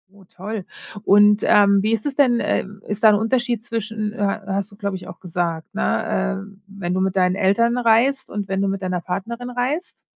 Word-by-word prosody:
Oh, 200 - -17
toll. 205 +2 -5 0.4
Und, 205 +1 +5
ähm, 200 -1 +5
wie 215 - +1
ist 220 -1 -1
es 285 -2 -2
denn, 255 -4 +3
äh, - - 0 0.2
ist 205 +1 -4
da 220 - +9
'n 210 - +5
Unterschied 240 +1 0
zwischen, 220 -2 -3
äh, 205 -4 -1
hast 200 0 -2
du, - - -14
glaube 200 -2 -3
ich, 180 -1 -9
auch 170 - -11
gesagt, 170 -2 -3
ne, 195 -2 -1
äh, 200 -1 -17
wenn 195 -3 -4
du 185 - 0
mit 190 0 0
deinen 180 0 +3
Eltern 230 +5 +2
reist 245 +3 +2
und 205 -1 -4
wenn 195 0 -1
du 200 - +1
mit 195 0 -3
deiner 180 -2 -2
Partnerin 230 +8 -5
reist? 260 +8 -3
205 Hz, 210 wpm, -21 LUFS, 190-230 Hz, 0.4 s, da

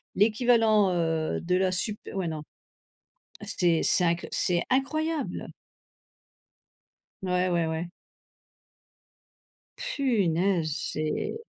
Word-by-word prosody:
l'équivalent, 220 -1 +3
heu, 165 -2 -1
de 180 +1 0
la 185 0 +1
sup 210 +3 0
ouais 190 -3 -2
non. 155 -1 -5 1.0
C'est 170 -3 +1
c'est 180 - +5
inc 170 0 0
c'est 175 -1 +2
incroyable. 310 +4 -1 1.8
Ouais, 180 0 +1
ouais, 170 -2 +1
ouais. 160 +2 -4 1.9
Punaise, 195 - 0 0.2
c'est 155 0 -2
180 Hz, 90 wpm, -27 LUFS, 170-220 Hz, 1.9 s, c'est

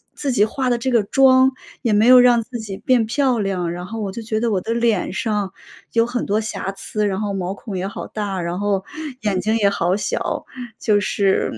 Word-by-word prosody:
自 280 -2 -2
己 210 -4 +4
化 255 +3 -2
得 240 - +2
这 255 +2 -2
个 230 -4 +3
妆 260 +3 +5 0.3
也 235 -4 0
没 210 +2 +4
有 255 0 +9
让 245 -1 +5
自 240 +1 -7
己 200 -3 -6
变 250 -3 +2
漂 255 0 +1
亮， 185 -4 -1
然 175 +1 -6
后 225 +2 -6
我 200 -2 -3
就 230 +4 -6
觉 220 0 -2
得 235 0 0
我 190 -3 0
的 225 +5 -2
脸 230 -5 +1
上 210 -3 -1 0.4
有 230 0 +3
很 240 0 -3
多 205 +2 +1
瑕 215 -3 -4
疵， 210 +2 -2
然 190 -1 -2
后 205 -2 -2
毛 190 0 -2
孔 200 -1 -7
也 185 +2 -2
好 200 - -6
大， 200 -3 -3
然 175 +2 -3
后 200 -2 0 0.4
眼 200 -4 0
睛 220 +1 +1
也 205 -2 +3
好 180 -1 0
小。 - - -2 0.3
就 210 -2 +2
是， 200 -1 +1
215 Hz, 245 characters per minute, -20 LUFS, 195-235 Hz, 0.4 s, 有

